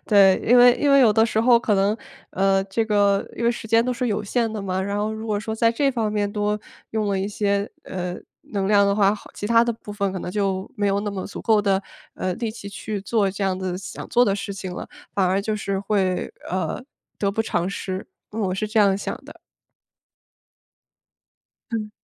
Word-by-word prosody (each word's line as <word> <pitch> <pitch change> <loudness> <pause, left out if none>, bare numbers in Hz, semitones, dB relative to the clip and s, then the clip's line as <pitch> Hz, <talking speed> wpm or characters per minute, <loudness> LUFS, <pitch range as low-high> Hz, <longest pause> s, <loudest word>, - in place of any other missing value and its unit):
对。 195 -3 +6
因 245 +2 +6
为 245 0 +8
因 290 - +1
为 275 0 +7
有 225 -5 +6
的 220 +1 +4
时 220 -1 0
候 235 0 +6
可 215 -3 +1
能， 200 +3 +2 0.3
呃 195 0 +2
这 210 +3 -1
个 205 -2 +2
因 235 - -2
为 235 - +4
时 230 -2 -6
间 230 +1 +4
都 250 - 0
是 245 +1 -2
有 205 - -1
限 230 +2 0
的 215 - -4
嘛， 190 -1 -1
然 200 +1 -2
后 215 +1 -1
如 220 +1 -6
果 210 -2 0
说 220 +1 -4
在 230 +1 +3
这 275 +4 +1
方 225 -5 -1
面 205 -1 0
多 210 0 -1 0.3
用 220 -1 -1
了 195 -1 0
一 195 +2 -1
些， 200 0 0
呃， 180 -1 -4 0.4
能 195 -2 0
量 200 -1 +5
的 200 - +2
话， 200 0 +4 0.2
其 205 - -4
它 230 +1 +5
的 235 0 0
部 210 -2 -10
分 200 -2 -1
可 190 - -3
能 180 - -5
就 195 -1 -1
没 205 -1 0
有 200 0 +1
那 205 0 -3
么 190 -2 -5
足 - - -7
够 220 -2 +4
的， 195 -1 +1 0.3
呃， 185 - -2
力 230 +1 -3
气 210 -2 -9
去 205 +1 -5
做 200 0 +1
这 195 +1 -3
样 185 -1 0
子 185 -1 -3
的 180 - -4
想 195 - -8
做 245 +1 +4
的 195 - +1
事 200 0 -4
情 190 -2 -6
了， - - -7 0.3
反 195 -2 +2
而 190 +2 +2
就 215 +1 -2
是 195 -2 -2
会， 195 -2 0 0.2
呃， 185 - -2 0.4
得 200 -1 +1
不 225 +2 0
偿 175 -4 -1
失。 190 -1 -4 0.2
呃， 215 - -7
我 185 -3 0
是 215 +2 -2
这 220 +1 0
样 195 -1 +4
想 - - -4
的。 - - -11 2.4
嗯。 215 -2 -2
205 Hz, 250 characters per minute, -23 LUFS, 195-220 Hz, 2.4 s, 为